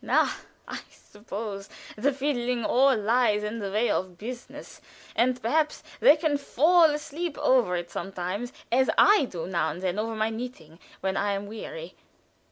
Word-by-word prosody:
Na! - - +3 0.4
I - - -5
suppose 205 -1 -8 0.3
the 260 +7 +1
fiddling 250 -4 -1
all 265 0 +4
lies 215 -1 +2
in 215 +2 -3
the 200 -2 -4
way 215 +4 +2
of 185 -1 -2
business, 240 +5 -9 0.3
and 250 +1 +2
perhaps 300 +7 0 0.2
they 290 - +7
can 300 -2 0
fall 325 +5 +4
asleep 305 +1 -2
over 240 -9 +3
it 175 0 -4
sometimes, 195 +5 -4 0.2
as 260 +2 +3
I 410 -8 +6
do 175 -9 -6
now 170 -4 0
and 160 - -6
then 185 +1 -1
over 225 +1 -2
my 220 +1 0
knitting, 220 -9 -8 0.2
when 190 0 -1
I'm 200 0 -1
weary. - - -8
230 Hz, 160 wpm, -27 LUFS, 195-270 Hz, 0.4 s, they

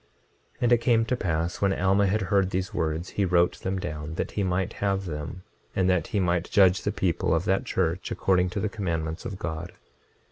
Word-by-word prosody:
26:33 - - -29
And 120 - +3
it 120 - +7
came 115 -1 +3
to 125 - 0
pass 85 -5 -2
when 100 -1 +3
Alma 100 +2 +3
had 105 +3 +1
heard 95 0 +2
these 95 0 -2
words 80 +1 -2
he 100 - -1
wrote 90 -1 +2
them 95 +1 -2
down 75 -3 -5
that - - -3
he 105 - -2
might 95 +1 0
have 100 -1 0
them, 80 +2 -6 0.3
and 95 -1 +2
that 90 -2 +1
he 105 - -1
might 90 -2 0
judge 95 -2 +5
the - - -1
people - - 0
of - - -1
that - - +1
church 85 +2 -1
according 90 -1 +2
to 95 - -3
the 110 - 0
commandments 80 -6 -3
of 100 - -5
God. 80 -1 -5
95 Hz, 215 wpm, -26 LUFS, 85-100 Hz, 0.3 s, it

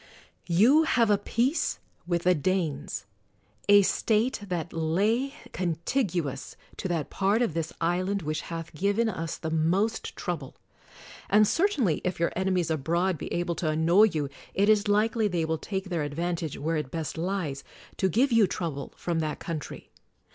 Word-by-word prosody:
You 225 - +5
have 240 -9 +3
a 205 - +5
peace 245 +9 0 0.3
with 170 -1 0
the 180 - +5
Danes 155 - -1 0.3
— 105 - -26
a 200 - +6
State 225 +6 +1
that 175 -2 -3
lay 210 - +1 0.2
contiguous 170 - -2 0.2
to - - -3
that 165 -5 -2
part 200 +5 +2
of 225 - -1
this 165 0 -2
island 185 +3 0
which 155 +1 -2
hath 165 -1 -6
given 200 +7 +1
us 165 -6 -3
the 160 - -4
most 185 +8 0
trouble. 160 -7 -4 0.7
And 210 +1 +5
certainly 260 - +1
if 180 -2 -2
your 170 - +1
enemies 185 -3 0
abroad 170 +5 +1
be - - -6
able 175 0 -1
to 160 - -1
an 155 +1 0
noy 185 +6 +7
you, 155 -9 -1 0.3
it 200 +2 +3
is 210 -1 +4
likely 215 +2 +2
they 175 -4 0
will 160 0 -1
take 190 -1 -4
their 160 -5 -1
advan 170 +4 -2
tage 160 -3 -4
(where 160 +2 -1
it 150 -4 -3
best 160 +1 -4
lies) 165 -5 -2 0.3
to 190 - +2
give 250 - +2
you 225 -4 +5
trouble 155 -7 -4
from 170 -2 -1
that 155 -1 -2
country. 160 -4 -6
175 Hz, 170 wpm, -27 LUFS, 160-205 Hz, 0.7 s, noy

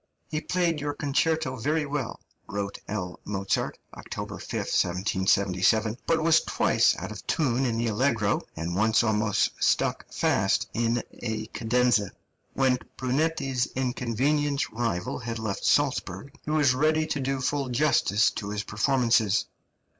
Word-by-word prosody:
"He 155 0 -1
played 170 -4 0
your 145 0 -2
concerto 150 0 0
very 150 +6 0
well," 140 -4 -4 0.3
wrote 100 0 -4
L. 90 -4 -4
Mozart 100 -1 -2 0.2
(October - - -7
5, - - -9
1777), 95 +3 +1
"but 165 -1 +2
was 165 0 +5
twice - - +2
out - - -6
of - - -9
tune 135 -3 +1
in 115 -1 -1
the 115 - 0
allegro, 115 -2 +1
and 85 +2 -3
once 110 +3 +3
almost 110 -2 +1
stuck - - +1
fast - - +1
in 115 0 0 0.2
a 110 -2 -3
cadenza." 120 -3 +2 0.4
When 130 -2 +2 0.2
Brunetti's 135 -1 0
inconvenient 135 +3 0
rival 110 -6 -2
had 115 0 -4
left 110 -3 -4
Salzburg, 140 -4 +1
he - - -5
was 150 -4 +3
ready 155 +4 +2
to 155 -2 -2
do 135 0 -1
full 135 +1 -1
justice 120 -6 +3
to 100 - -5
his 105 0 -3
performances. 115 -2 +2
120 Hz, 140 wpm, -27 LUFS, 105-145 Hz, 0.4 s, was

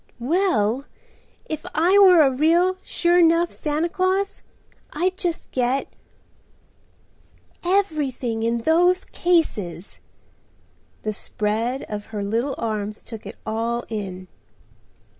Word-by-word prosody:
"Well, 265 - +1 0.6
if 310 -1 -5
I 360 +6 +4
were 365 -5 +8
a 270 - +3
real, 340 +7 +3
sure 350 0 +2
'nough 335 +1 +4
Santa 305 +2 -1
Claus, 375 +3 -1 0.5
I'd 365 +4 0
just 350 -4 -3
get—everything 270 - -4
in 230 +1 0
those 355 +5 +3
cases." 210 - -1 1.0
The 215 - -2
spread 220 +5 -2
of 210 -1 -6
her 210 -2 -4
little 230 +7 -1
arms 215 -2 -3
took 220 -3 -9
it 205 - -9
all 230 +2 -2
in. 190 -4 -5
275 Hz, 105 wpm, -23 LUFS, 220-345 Hz, 1.0 s, were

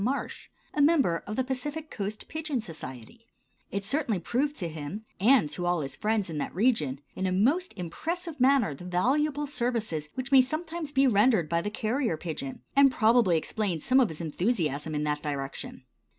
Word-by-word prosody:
Marsh, 265 +5 -3 0.2
a 295 - +1
member 285 - +4
of 210 - -3
the 260 - +1
Pacific 295 +5 -4
Coast 205 +1 -4
Pigeon 310 -4 -2
Society. 165 - -8 0.4
It 200 0 -3
certainly 240 - 0
proved 270 - -1
to 175 - -3
him, 165 +7 -6
and 230 - +5
to 175 +3 -3
all 175 -2 +1
his 135 -2 -5
friends 215 -2 0
in 160 -3 -4
that - - -4
region, 175 - +1
in 190 - -1
a - - 0
most 275 - +2
impressive 315 - -4
manner 255 - +4
the 140 - -11
valuable 275 +12 +1
services 230 - -2
which 260 +1 -4
may 270 -1 +8
sometimes 315 +3 -3
be 275 -1 +4
rendered 215 - +4
by 170 +1 +1
the 205 - -2
carrier 220 - -1
pigeon, 155 -5 -6
and 275 -1 +7
probably 225 -7 +4
explains 180 -2 -2
some 260 +1 +5
of 245 -6 +4
his 160 +1 -6
enthusiasm 160 - -1
in 150 - 0
that 150 0 -1
direction. 140 -3 -5
215 Hz, 180 wpm, -28 LUFS, 165-270 Hz, 0.4 s, may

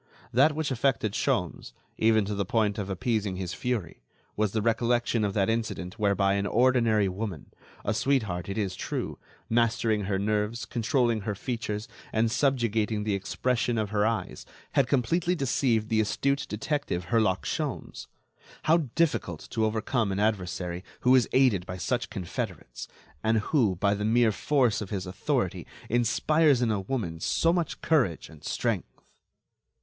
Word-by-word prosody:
That 140 +5 +4
which 155 -2 -1
affected 120 -4 +1
Sholmes, - - -1 0.3
even 110 -2 +4
to 105 - -3
the 100 0 0
point 105 +1 0
of 100 -1 -4
appeasing 100 0 -1
his 90 -1 -4
fury, 120 -9 -3 0.3
was 105 -2 +1
the 110 - 0
recollection 115 0 +1
of 100 -2 -1
that 100 -2 +2
incident 110 -3 -2
whereby 100 -1 +2
an 100 0 0
ordinary 115 -4 +3
woman, 95 -5 -5 0.3
a 105 - +1
sweetheart 105 -9 0
it 100 - -3
is 100 -4 -1
true, - - -4 0.3
mastering 115 -2 +1
her 95 0 0
nerves, 105 +3 -1
controlling 120 -2 +1
her 105 0 -3
features, 110 -1 -4 0.2
and 110 0 +1
subjugating 115 -6 +1
the 105 -1 0
expression 120 +5 -1
of 105 -2 -1
her 105 -1 +2
eyes, 115 +1 -2 0.3
had 135 -3 +3
completely 165 +8 +1
deceived 125 -6 +1
the 110 -1 +3
astute 140 +6 0
detective 105 - -2
Herlock 105 -4 +2
Sholmes. - - -4 0.6
How 160 +2 +5 0.2
difficult 145 - 0
to 110 -2 +1
overcome 110 0 0
an 95 - -2
adversary 90 -4 -1 0.2
who 125 - +5
is 125 -4 +4
aided 125 -9 +3
by 90 - -5
such 120 +7 -1
confederates, 95 -5 -5 0.4
and 110 0 +3
who, 110 -3 +2
by 100 +3 +2
the 105 0 -3
mere 115 +1 +4
force 125 0 +1
of 100 - -5
his 95 -3 -3
authority, 90 +1 -2 0.2
inspires 125 +4 +3
in 115 - +2
a 105 - 0
woman 95 -7 -3
so 165 - +2
much 175 -2 -2
courage 130 - +1
and 80 -2 -15
strength! - - -2
110 Hz, 155 wpm, -27 LUFS, 100-125 Hz, 0.6 s, How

